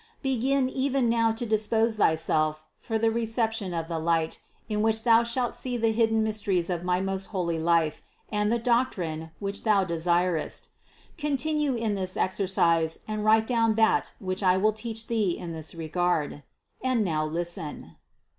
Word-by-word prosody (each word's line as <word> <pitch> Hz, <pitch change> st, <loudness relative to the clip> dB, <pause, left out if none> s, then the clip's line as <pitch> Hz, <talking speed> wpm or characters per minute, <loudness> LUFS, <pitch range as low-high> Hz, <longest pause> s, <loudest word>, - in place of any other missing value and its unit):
Begin 270 Hz, +1 st, +1 dB
even 265 Hz, -1 st, 0 dB
now 230 Hz, -1 st, +3 dB
to 225 Hz, +2 st, -3 dB
dispose 220 Hz, +1 st, +1 dB
thyself 155 Hz, -3 st, +1 dB
for 225 Hz, -, -2 dB
the 225 Hz, 0 st, +2 dB
reception 225 Hz, -3 st, -1 dB
of 165 Hz, -1 st, -3 dB
the 165 Hz, -1 st, -3 dB
light, 165 Hz, 0 st, 0 dB, 0.3 s
in 210 Hz, -2 st, -1 dB
which 220 Hz, 0 st, +1 dB
thou 230 Hz, -1 st, +5 dB
shalt 240 Hz, +1 st, -1 dB
see 250 Hz, -2 st, -3 dB
the 225 Hz, -1 st, +2 dB
hidden 225 Hz, 0 st, +2 dB
mysteries 200 Hz, -5 st, 0 dB
of 175 Hz, -1 st, -2 dB
my 180 Hz, 0 st, +1 dB
most 195 Hz, 0 st, -3 dB
fioly 170 Hz, -5 st, -1 dB
life 165 Hz, -2 st, +2 dB, 0.3 s
and 210 Hz, 0 st, +1 dB
the 235 Hz, -, +2 dB
doctrine, 205 Hz, -10 st, -1 dB
which 200 Hz, 0 st, -4 dB
thou 210 Hz, -3 st, +3 dB
de 170 Hz, -3 st, -3 dB
sirest. 175 Hz, 0 st, 0 dB, 0.5 s
Continue 295 Hz, -1 st, 0 dB
in 225 Hz, -2 st, -1 dB
this 185 Hz, -2 st, -2 dB
exercise 170 Hz, -4 st, +1 dB
and 215 Hz, -1 st, -3 dB
write 220 Hz, +1 st, +4 dB
down 230 Hz, -2 st, +2 dB
that 220 Hz, 0 st, +2 dB
which 185 Hz, 0 st, -3 dB
I 185 Hz, -1 st, +4 dB
will 215 Hz, +3 st, +2 dB
teach 225 Hz, +1 st, -4 dB
thee 215 Hz, -7 st, 0 dB
in 175 Hz, -2 st, -6 dB
this 160 Hz, 0 st, -6 dB
regard. 165 Hz, -2 st, -1 dB, 0.4 s
And 255 Hz, -4 st, +1 dB
now 155 Hz, -3 st, 0 dB
listen. 170 Hz, 0 st, -5 dB
210 Hz, 165 wpm, -27 LUFS, 170-230 Hz, 0.5 s, thou